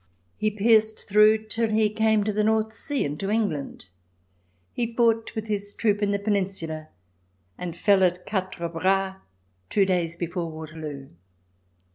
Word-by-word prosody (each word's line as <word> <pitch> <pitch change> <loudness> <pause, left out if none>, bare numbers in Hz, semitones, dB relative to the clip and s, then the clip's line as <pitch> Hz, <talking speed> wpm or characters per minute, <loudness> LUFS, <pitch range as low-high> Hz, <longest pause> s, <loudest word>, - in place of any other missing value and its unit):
He 215 - 0
pierced 220 +1 +2
through 215 +1 +5
till 225 +1 -1
he 215 0 +3
came 220 -1 +2
to 210 0 -1
the 210 +1 +1
North 220 0 +1
Sea 280 +5 -2
and 145 +1 -4
to 195 - -2
England. 205 - -2 0.9
He 235 -1 -3
fought 230 -1 +2
with 220 -1 -3
his 205 -1 -4
troop 210 -2 +1
in 205 - +1
the 200 - +1
Peninsula, 190 -6 -2 0.7
and 170 - -6
fell 200 +1 +4
at 180 0 +1
Quatre 185 -4 -3
Bras 190 +3 0 0.5
two 200 - +3
days 175 -3 0
before 170 0 -3
Waterloo. 155 -3 -8
200 Hz, 150 wpm, -25 LUFS, 175-220 Hz, 0.9 s, through